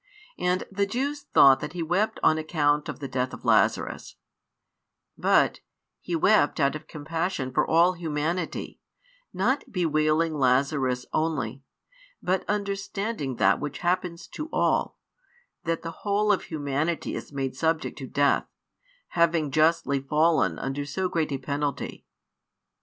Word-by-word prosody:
And 180 Hz, +1 st, +1 dB
the 200 Hz, +1 st, 0 dB
Jews 280 Hz, +7 st, -3 dB
thought 135 Hz, -1 st, +7 dB
that 150 Hz, -, -6 dB
He 175 Hz, -2 st, -3 dB
wept 180 Hz, +7 st, 0 dB
on 155 Hz, -, +4 dB
account 150 Hz, -2 st, +1 dB
of -, -, -5 dB
the 140 Hz, -, -5 dB
death 130 Hz, 0 st, -2 dB
of -, -, -15 dB
Lazarus, -, -, +1 dB, 1.0 s
but -, -, +3 dB, 0.4 s
He 175 Hz, -, -3 dB
|124 -, -, -8 dB
wept 210 Hz, -9 st, +4 dB
out 140 Hz, 0 st, +2 dB
of 155 Hz, 0 st, -8 dB
compassion 155 Hz, -3 st, -3 dB
for -, -, +2 dB
all 170 Hz, +3 st, +4 dB
humanity, 165 Hz, 0 st, -3 dB, 0.5 s
not 255 Hz, +9 st, 0 dB
bewailing 160 Hz, -2 st, +1 dB
Lazarus 130 Hz, -2 st, +1 dB
only, 140 Hz, -6 st, -1 dB, 0.6 s
but 185 Hz, +1 st, 0 dB
understanding 200 Hz, -, -2 dB
that -, -, +3 dB
which 145 Hz, -1 st, -4 dB
happens 175 Hz, -1 st, -1 dB
to 305 Hz, +1 st, -6 dB
all, -, -, +1 dB, 0.7 s
that 165 Hz, 0 st, -1 dB
the 165 Hz, 0 st, -6 dB
whole 210 Hz, +1 st, +2 dB
of 200 Hz, -, 0 dB
humanity 155 Hz, +2 st, -2 dB
is -, -, -6 dB
made 135 Hz, -2 st, -3 dB
subject 160 Hz, +3 st, 0 dB
to 135 Hz, -, -6 dB
death, 140 Hz, +2 st, +2 dB, 0.6 s
having 165 Hz, -3 st, +2 dB
justly 155 Hz, -2 st, +2 dB
fallen 150 Hz, -, +2 dB
under 135 Hz, +2 st, -3 dB
so 180 Hz, +7 st, -2 dB
great 160 Hz, -3 st, -1 dB
a 135 Hz, -, -1 dB
penalty. 140 Hz, +1 st, -4 dB
155 Hz, 140 wpm, -26 LUFS, 140-180 Hz, 1.0 s, thought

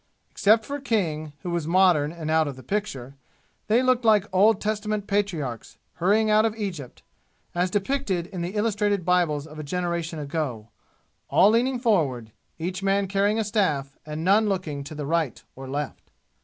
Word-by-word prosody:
Except 220 Hz, +2 st, +3 dB
for 285 Hz, +1 st, -4 dB
King, 165 Hz, -, -1 dB
who 175 Hz, -, -3 dB
was 170 Hz, -3 st, -2 dB
modern 170 Hz, -4 st, +4 dB
and 160 Hz, -2 st, -5 dB
out 160 Hz, -1 st, +3 dB
of 140 Hz, -, -5 dB
the 130 Hz, -, -12 dB
picture, 140 Hz, -, -4 dB, 0.5 s
they 230 Hz, +4 st, +3 dB
looked 255 Hz, -1 st, +2 dB
like 215 Hz, -3 st, +4 dB
Old 205 Hz, +2 st, +5 dB
Testament 215 Hz, -1 st, -2 dB
patriarchs, 170 Hz, -, -2 dB, 0.2 s
hurrying 205 Hz, +5 st, +3 dB
out 215 Hz, 0 st, +4 dB
of 220 Hz, -1 st, 0 dB
Egypt, 180 Hz, -, -6 dB, 0.5 s
as 180 Hz, +1 st, +1 dB
depicted 200 Hz, -3 st, -1 dB
in 185 Hz, -1 st, -6 dB
the 175 Hz, +4 st, -4 dB
illustrated 205 Hz, -3 st, 0 dB
Bibles 170 Hz, -5 st, +1 dB
of 155 Hz, -1 st, -11 dB
a -, -, -4 dB
generation 170 Hz, 0 st, -2 dB
ago 140 Hz, -7 st, -4 dB, 0.6 s
all 200 Hz, -, +5 dB
leaning 250 Hz, +3 st, +2 dB
forward 150 Hz, -, 0 dB, 0.3 s
each 180 Hz, +3 st, -4 dB
man 195 Hz, 0 st, +1 dB
carrying 200 Hz, +2 st, +1 dB
a 225 Hz, -, +1 dB
staff 160 Hz, -11 st, 0 dB
and 155 Hz, +1 st, -5 dB
none 205 Hz, +4 st, +4 dB
looking 160 Hz, -8 st, -3 dB
to 155 Hz, -, -8 dB
the 150 Hz, -1 st, -4 dB
right 160 Hz, -4 st, -1 dB
or 135 Hz, 0 st, -9 dB
left. 145 Hz, 0 st, -5 dB
180 Hz, 170 wpm, -25 LUFS, 155-210 Hz, 0.6 s, Old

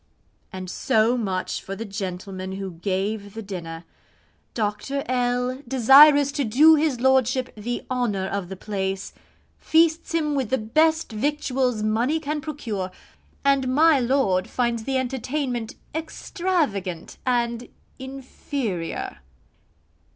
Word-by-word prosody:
And 185 Hz, -1 st, -6 dB
so 220 Hz, +6 st, +2 dB
much 190 Hz, -6 st, -2 dB
for 195 Hz, -, -6 dB
the 225 Hz, -, -5 dB
gentleman 190 Hz, -1 st, -5 dB
who 195 Hz, -1 st, -5 dB
gave 200 Hz, +4 st, -3 dB
the 225 Hz, -, -5 dB
dinner. 170 Hz, -4 st, -7 dB, 0.7 s
Dr. 230 Hz, +6 st, -2 dB
L, 250 Hz, +1 st, 0 dB
desirous 280 Hz, +3 st, +7 dB
to 285 Hz, -, -1 dB
do 275 Hz, +8 st, +6 dB
his 300 Hz, -5 st, +2 dB
lordship 260 Hz, 0 st, +2 dB
'the 235 Hz, +3 st, -5 dB
honour 225 Hz, -7 st, 0 dB
of 195 Hz, -3 st, -3 dB
the 190 Hz, -, -5 dB
place,' 190 Hz, -1 st, -4 dB, 0.5 s
feasts 325 Hz, 0 st, +2 dB
him 305 Hz, -3 st, +1 dB
with 265 Hz, -6 st, -1 dB
the 265 Hz, -, +2 dB
best 315 Hz, +9 st, +2 dB
victuals 255 Hz, -1 st, 0 dB
money 235 Hz, +9 st, +1 dB
can 300 Hz, 0 st, -3 dB
procure 230 Hz, -11 st, -4 dB, 0.6 s
and 275 Hz, -2 st, +3 dB
my 300 Hz, +3 st, +5 dB
lord 240 Hz, -8 st, +1 dB
finds 235 Hz, -2 st, -1 dB
the 270 Hz, -1 st, 0 dB
entertainment 255 Hz, -2 st, -2 dB, 0.2 s
extravagant 310 Hz, -, -2 dB
and 240 Hz, -1 st, -1 dB, 0.3 s
inferior. 260 Hz, -, -5 dB
245 Hz, 120 wpm, -24 LUFS, 200-275 Hz, 0.7 s, desirous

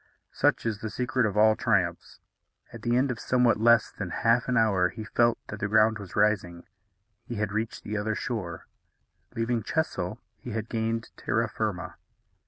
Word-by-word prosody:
Such -, -, +1 dB
is 110 Hz, -3 st, -1 dB
the 110 Hz, -, -3 dB
secret 125 Hz, +2 st, 0 dB
of 105 Hz, 0 st, -4 dB
all 110 Hz, +1 st, +6 dB
triumphs. 95 Hz, -8 st, -1 dB, 0.5 s
At 115 Hz, -, -9 dB
the 120 Hz, +1 st, +1 dB
end 130 Hz, +1 st, +2 dB
of 120 Hz, -, -5 dB
somewhat 125 Hz, -3 st, +2 dB
less 115 Hz, 0 st, +4 dB
than 100 Hz, -4 st, -5 dB
half 115 Hz, +6 st, +2 dB
an 125 Hz, -1 st, +1 dB
hour 100 Hz, -5 st, +3 dB
he 110 Hz, -, -7 dB
felt 120 Hz, 0 st, +2 dB
that 105 Hz, -, -6 dB
the 105 Hz, -, -1 dB
ground 110 Hz, +1 st, +3 dB
was 100 Hz, -3 st, -9 dB
rising. 100 Hz, -5 st, +1 dB, 0.6 s
He 120 Hz, -, -5 dB
had 105 Hz, -1 st, -2 dB
reached 110 Hz, +2 st, -3 dB
the 105 Hz, +1 st, -3 dB
other 110 Hz, +1 st, -1 dB
shore. 95 Hz, -11 st, -4 dB, 0.7 s
Leaving 115 Hz, 0 st, 0 dB
Chesil, 110 Hz, -, -2 dB, 0.2 s
he 120 Hz, -, -8 dB
had 110 Hz, 0 st, -4 dB
gained 115 Hz, 0 st, -2 dB
terra -, -, 0 dB
firma. -, -, -4 dB
110 Hz, 180 wpm, -27 LUFS, 105-120 Hz, 0.7 s, all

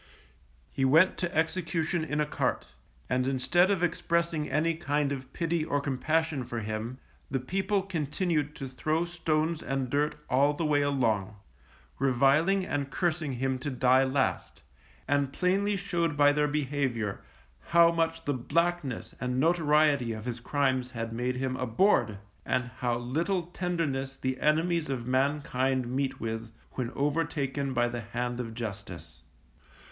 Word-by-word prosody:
He 135 Hz, -, -2 dB
went 160 Hz, +8 st, +5 dB
to 175 Hz, -1 st, -1 dB
execution 165 Hz, 0 st, 0 dB
in 150 Hz, -1 st, -2 dB
a 150 Hz, -, +2 dB
cart, 150 Hz, -, -1 dB, 0.4 s
and 125 Hz, +1 st, 0 dB
instead 135 Hz, +8 st, +3 dB
of 195 Hz, -3 st, +1 dB
expressing 170 Hz, -2 st, 0 dB
any 165 Hz, +2 st, +1 dB
kind 150 Hz, -3 st, -1 dB
of 130 Hz, -2 st, -5 dB
pity 165 Hz, -1 st, -1 dB
or 145 Hz, -2 st, 0 dB
compassion 150 Hz, +1 st, 0 dB
for 120 Hz, -1 st, -4 dB
him, 110 Hz, +3 st, -4 dB, 0.3 s
the 135 Hz, -, 0 dB
people 195 Hz, -, 0 dB
continued 155 Hz, -3 st, -1 dB
to 135 Hz, -, -5 dB
throw 155 Hz, +6 st, -1 dB
stones 165 Hz, -1 st, -1 dB
and 135 Hz, -2 st, -2 dB
dirt 145 Hz, +1 st, +1 dB
all 140 Hz, +3 st, +3 dB
the 160 Hz, +2 st, -2 dB
way 145 Hz, -1 st, +3 dB
along, 115 Hz, -8 st, 0 dB, 0.6 s
reviling 140 Hz, +9 st, +3 dB
and 140 Hz, -4 st, -2 dB
cursing 160 Hz, -3 st, -1 dB
him 130 Hz, +1 st, -1 dB
to 145 Hz, -, -3 dB
die 130 Hz, 0 st, +4 dB
last, 135 Hz, 0 st, -1 dB, 0.4 s
and 140 Hz, -1 st, +1 dB
plainly 195 Hz, +5 st, +1 dB
showed 170 Hz, -6 st, -1 dB
by 145 Hz, 0 st, +6 dB
their 150 Hz, 0 st, +2 dB
behaviour 135 Hz, -8 st, -1 dB, 0.5 s
how 170 Hz, 0 st, +6 dB
much 165 Hz, 0 st, -1 dB
the 145 Hz, -, +1 dB
blackness 140 Hz, -3 st, -1 dB
and 125 Hz, 0 st, -1 dB
notoriety 150 Hz, -5 st, +3 dB
of 110 Hz, 0 st, -7 dB
his 120 Hz, -1 st, -3 dB
crimes 130 Hz, -1 st, 0 dB
had 115 Hz, -2 st, -5 dB
made 125 Hz, +2 st, -1 dB
him 130 Hz, 0 st, -2 dB
abhorred, 120 Hz, -, +2 dB, 0.3 s
and 125 Hz, -1 st, -1 dB
how 120 Hz, -1 st, 0 dB
little 165 Hz, +10 st, -1 dB
tenderness 165 Hz, -7 st, -2 dB
the 130 Hz, -1 st, -3 dB
enemies 160 Hz, +1 st, +1 dB
of 125 Hz, -3 st, -3 dB
mankind 130 Hz, -1 st, +1 dB
meet 135 Hz, 0 st, -1 dB
with, 115 Hz, 0 st, -4 dB, 0.2 s
when 125 Hz, -2 st, -3 dB
overtaken 140 Hz, -2 st, -1 dB
by 120 Hz, -1 st, +2 dB
the 120 Hz, 0 st, -4 dB
hand 120 Hz, +2 st, -3 dB
of 115 Hz, -2 st, -5 dB
Justice. 100 Hz, -8 st, -7 dB
140 Hz, 150 wpm, -29 LUFS, 125-165 Hz, 0.6 s, by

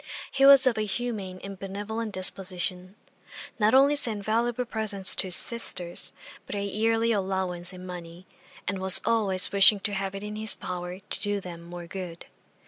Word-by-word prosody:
He 275 Hz, 0 st, +4 dB
was 275 Hz, -2 st, +9 dB
of 240 Hz, -4 st, +2 dB
a -, -, +1 dB
humane 205 Hz, -3 st, -4 dB
and 195 Hz, -1 st, -8 dB
benevolent 210 Hz, +3 st, -4 dB
disposition; 185 Hz, 0 st, -1 dB, 0.6 s
not 215 Hz, +3 st, +4 dB
only 280 Hz, +2 st, +6 dB
sent 220 Hz, -8 st, -4 dB
valuable 235 Hz, +3 st, 0 dB
presents 215 Hz, -5 st, -1 dB
to -, -, +3 dB
his 180 Hz, -, +6 dB
sisters, 180 Hz, -7 st, -3 dB, 0.4 s
but -, -, -5 dB
a 200 Hz, -, -2 dB
yearly 225 Hz, +3 st, +1 dB
allowance 190 Hz, -3 st, -2 dB
in 185 Hz, 0 st, -10 dB
money, 175 Hz, 0 st, -9 dB, 0.4 s
and 190 Hz, 0 st, -1 dB
was 190 Hz, 0 st, +5 dB
always 200 Hz, -5 st, +2 dB
wishing 200 Hz, +1 st, +6 dB
to 205 Hz, -, -2 dB
have 195 Hz, 0 st, -3 dB
it 195 Hz, -, -6 dB
in 210 Hz, 0 st, -5 dB
his 220 Hz, 0 st, -2 dB
power 180 Hz, 0 st, -5 dB
to 195 Hz, -, -7 dB
do 205 Hz, 0 st, -1 dB
them 175 Hz, -3 st, -9 dB
more 175 Hz, 0 st, -9 dB
good. 175 Hz, -1 st, -7 dB
195 Hz, 175 wpm, -27 LUFS, 185-220 Hz, 0.6 s, was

